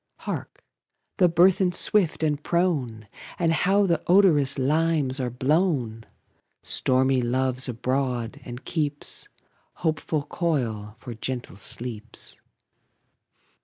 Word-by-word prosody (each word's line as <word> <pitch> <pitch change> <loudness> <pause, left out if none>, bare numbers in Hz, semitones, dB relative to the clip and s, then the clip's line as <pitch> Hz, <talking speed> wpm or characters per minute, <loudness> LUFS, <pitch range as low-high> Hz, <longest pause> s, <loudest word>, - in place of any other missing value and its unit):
Hark! - - -6 0.5
the 180 -3 +5
burthen, 180 +2 +4
swift 180 -3 +2
and 150 -2 0
prone! 145 - -1 0.3
And 165 -2 +2
how 195 +5 +3
the 170 -3 +1
odorous 165 -8 +4
limes 150 -1 +1
are 125 -1 -1
blown! 130 - 0 0.6
Stormy 130 0 +2
Love's 130 +1 0
abroad, 125 -1 -2
and 125 +2 -9
keeps 150 -3 -3 0.6
Hopeful 155 -1 0
coil 120 -11 -2
for 120 0 -8
gentle 125 +1 -5
sleeps. 110 +2 -3
135 Hz, 100 wpm, -25 LUFS, 125-165 Hz, 0.6 s, the